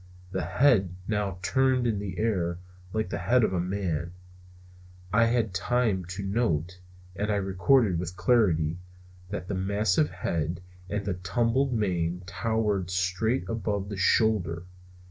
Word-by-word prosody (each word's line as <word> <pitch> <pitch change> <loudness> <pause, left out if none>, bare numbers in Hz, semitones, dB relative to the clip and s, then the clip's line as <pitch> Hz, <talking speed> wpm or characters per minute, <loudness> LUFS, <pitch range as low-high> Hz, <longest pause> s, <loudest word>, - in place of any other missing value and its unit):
The 95 -1 -1
head 95 - +3
now 105 -3 -1
turned 130 +2 +2
in 110 -4 +1
the 95 -2 -5
air, 90 -6 0 0.3
like 110 -3 -1
the - - -2
head 125 0 +3
of 95 - +1
a 90 - +1
man. 90 -2 -2 1.0
I 115 +2 +5
had 115 -4 +1
time 105 -1 +1
to 95 +3 -6
note, 95 -4 -1 0.4
and 105 +2 -1
I - - +2
record 100 +6 +3
it 90 -5 -1
with 90 0 -5
certainty, 90 -9 +2 0.5
that 100 -2 -5
the 100 - -3
massive 95 -4 +1
head 85 -1 -2 0.3
and 105 0 -2
the 100 - 0
tumbled 115 +9 0
mane 90 -5 -1
towered 105 -2 -1
straight 95 +6 0
above 105 -3 -2
the 105 - -4
shoulder. 95 -3 +2
95 Hz, 145 wpm, -27 LUFS, 90-110 Hz, 1.0 s, I